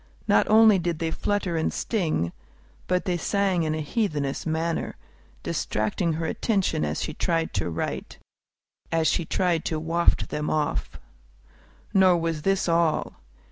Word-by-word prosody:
Not -, -, +4 dB
only 215 Hz, -2 st, +7 dB
did 170 Hz, -1 st, -1 dB
they 165 Hz, 0 st, -2 dB
flutter 200 Hz, -1 st, -1 dB
and 160 Hz, -, 0 dB
sting, 160 Hz, -, -1 dB, 0.6 s
but 180 Hz, 0 st, 0 dB
they 180 Hz, -2 st, 0 dB
sang 195 Hz, 0 st, +1 dB
in 155 Hz, -1 st, 0 dB
a 155 Hz, -, -3 dB
heathenish 150 Hz, -, -2 dB
manner, 160 Hz, +1 st, -1 dB, 0.5 s
distracting 110 Hz, -, -1 dB
her 165 Hz, +1 st, -2 dB
attention 190 Hz, -4 st, 0 dB
as -, -, -2 dB
she -, -, -4 dB
tried 165 Hz, -2 st, -1 dB
to 95 Hz, -3 st, -1 dB
write, 80 Hz, -, -4 dB, 0.7 s
as 165 Hz, -1 st, +2 dB
she 170 Hz, -, +1 dB
tried 170 Hz, -1 st, 0 dB
to 160 Hz, -, -1 dB
waft 165 Hz, +2 st, +1 dB
them 150 Hz, 0 st, -2 dB
off. 150 Hz, -1 st, -1 dB, 0.9 s
Nor 185 Hz, -2 st, +5 dB
was 165 Hz, -2 st, -2 dB
this 195 Hz, +3 st, +1 dB
all. 165 Hz, -2 st, +1 dB
165 Hz, 145 wpm, -25 LUFS, 155-185 Hz, 0.9 s, only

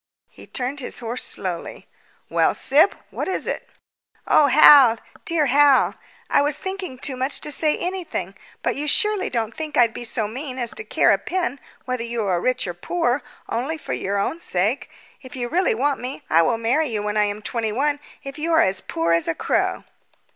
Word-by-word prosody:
He -, -, -15 dB
turned 260 Hz, +3 st, -3 dB
his 255 Hz, -, -4 dB
horse 240 Hz, +1 st, -3 dB
slowly. 180 Hz, -3 st, -5 dB, 0.4 s
"Well, -, -, +2 dB
Syb, 300 Hz, +8 st, +3 dB, 0.2 s
what -, -, -4 dB
is 380 Hz, -, -2 dB
it?" -, -, -4 dB, 0.6 s
"Oh, 295 Hz, -, +5 dB
Hal, 270 Hz, -4 st, +8 dB, 0.3 s
dear 330 Hz, -3 st, +1 dB
Hal! 280 Hz, 0 st, +4 dB, 0.3 s
I -, -, +3 dB
was 290 Hz, 0 st, +1 dB
thinking 380 Hz, -8 st, -5 dB
too 260 Hz, +1 st, -2 dB
much 260 Hz, +3 st, -1 dB
to 300 Hz, -, -3 dB
say 305 Hz, +1 st, +1 dB
anything; 350 Hz, -, -4 dB, 0.3 s
but -, -, 0 dB
you 295 Hz, +2 st, -3 dB
surely 420 Hz, +5 st, +2 dB
don't 230 Hz, -2 st, -2 dB
think 310 Hz, -2 st, -5 dB
I'd 235 Hz, -2 st, +4 dB
be -, -, -7 dB
so 220 Hz, -2 st, -2 dB
mean 260 Hz, +4 st, -6 dB
as 240 Hz, -2 st, 0 dB
to 435 Hz, -, -4 dB
care -, -, +3 dB
a -, -, +3 dB
pin 360 Hz, -6 st, -2 dB, 0.3 s
whether 255 Hz, -2 st, -2 dB
you 235 Hz, -1 st, -3 dB
are 180 Hz, -3 st, 0 dB
rich 255 Hz, +3 st, 0 dB
or 175 Hz, -, -4 dB
poor 255 Hz, -, -1 dB, 0.3 s
only 270 Hz, +8 st, -2 dB
for -, -, -5 dB
your 200 Hz, +1 st, -2 dB
own 255 Hz, +11 st, -1 dB
sake? 210 Hz, -, -1 dB, 0.3 s
If 260 Hz, +1 st, -11 dB
you 245 Hz, -2 st, -3 dB
really 355 Hz, 0 st, +1 dB
want 275 Hz, +4 st, 0 dB
me, 255 Hz, +3 st, -6 dB
I 165 Hz, -, +6 dB
will 225 Hz, +7 st, +1 dB
marry 255 Hz, +8 st, +1 dB
you 215 Hz, -4 st, -3 dB
when 210 Hz, 0 st, -2 dB
I 210 Hz, -1 st, +3 dB
am 205 Hz, +1 st, -4 dB
twenty 225 Hz, -2 st, -2 dB
one 290 Hz, +5 st, 0 dB, 0.2 s
if 275 Hz, +2 st, -8 dB
you 330 Hz, +2 st, -1 dB
are 320 Hz, -, +6 dB
as 190 Hz, 0 st, +1 dB
poor 165 Hz, +1 st, -1 dB
as 170 Hz, 0 st, +1 dB
a 165 Hz, -, 0 dB
crow." -, -, 0 dB
255 Hz, 205 wpm, -22 LUFS, 225-300 Hz, 0.6 s, Hal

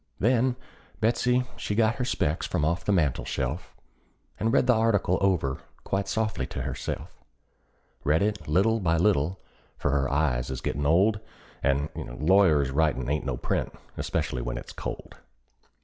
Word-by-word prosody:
Then 125 Hz, +3 st, +3 dB, 0.4 s
Betsey 125 Hz, +2 st, +2 dB
she 105 Hz, -, -3 dB
got 110 Hz, 0 st, +2 dB
her 125 Hz, -, -1 dB
specs 80 Hz, -9 st, 0 dB
from 80 Hz, -4 st, 0 dB
off 85 Hz, +3 st, 0 dB
the -, -, +2 dB
mantel 80 Hz, -9 st, +2 dB
shelf, 70 Hz, +7 st, -3 dB, 0.6 s
And 115 Hz, -, +1 dB
read 135 Hz, -, +4 dB
the 125 Hz, -, +5 dB
article 110 Hz, -5 st, +2 dB
over 90 Hz, -9 st, +1 dB, 0.2 s
quite 95 Hz, +1 st, -1 dB
softly 110 Hz, -2 st, -1 dB
to -, -, -5 dB
herself; -, -, -5 dB, 0.8 s
Read 80 Hz, +5 st, +3 dB
it 105 Hz, -1 st, 0 dB
by 75 Hz, -, -7 dB
little 110 Hz, +7 st, +3 dB
and 85 Hz, -2 st, +2 dB
little, 90 Hz, -1 st, +2 dB, 0.4 s
for 70 Hz, -, 0 dB
her 70 Hz, -2 st, +1 dB
eyes 65 Hz, -4 st, +1 dB
is 65 Hz, -1 st, -4 dB
gettin' 70 Hz, 0 st, -1 dB
old, 100 Hz, +7 st, +4 dB, 0.4 s
And 70 Hz, +2 st, +1 dB, 0.3 s
lawyers' 80 Hz, -5 st, +4 dB
writin' 70 Hz, -4 st, +1 dB
ain't 75 Hz, -2 st, -1 dB
no 65 Hz, -3 st, -1 dB
print, -, -, -2 dB, 0.2 s
especially 60 Hz, -, -2 dB
when -, -, -3 dB
it's -, -, -8 dB
cold. -, -, -7 dB
85 Hz, 160 wpm, -27 LUFS, 70-105 Hz, 0.8 s, the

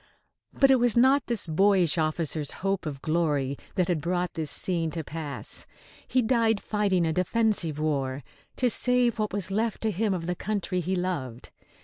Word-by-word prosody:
But 275 Hz, -1 st, +4 dB
it 265 Hz, -, +6 dB
was 240 Hz, -1 st, +2 dB
not 265 Hz, +2 st, +4 dB
this 235 Hz, -4 st, 0 dB
boyish 180 Hz, 0 st, +3 dB
officer's 155 Hz, -1 st, 0 dB, 0.2 s
hope 195 Hz, -4 st, 0 dB
of 140 Hz, -3 st, -6 dB
glory 150 Hz, -4 st, 0 dB, 0.2 s
that 180 Hz, -2 st, +1 dB
had 170 Hz, -4 st, 0 dB
brought 175 Hz, +2 st, -1 dB
this 155 Hz, -2 st, -2 dB
scene 165 Hz, 0 st, +1 dB
to 160 Hz, 0 st, -5 dB
pass. 150 Hz, -1 st, -5 dB, 0.4 s
He 255 Hz, -1 st, +2 dB
died 225 Hz, -2 st, +2 dB
fighting 200 Hz, -5 st, 0 dB
a 160 Hz, -, 0 dB
defensive 185 Hz, -4 st, +1 dB
war, 140 Hz, -3 st, -2 dB, 0.3 s
to 255 Hz, -, +1 dB
save 245 Hz, 0 st, +2 dB
what 215 Hz, -1 st, -1 dB
was 195 Hz, -1 st, -2 dB
left 220 Hz, +2 st, -1 dB
to 220 Hz, -, 0 dB
him 210 Hz, +2 st, 0 dB
of 165 Hz, -2 st, -5 dB
the 180 Hz, -, -1 dB
country 195 Hz, -1 st, -2 dB
he 180 Hz, +2 st, -1 dB
loved. 145 Hz, -10 st, -4 dB
180 Hz, 175 wpm, -27 LUFS, 155-220 Hz, 0.4 s, it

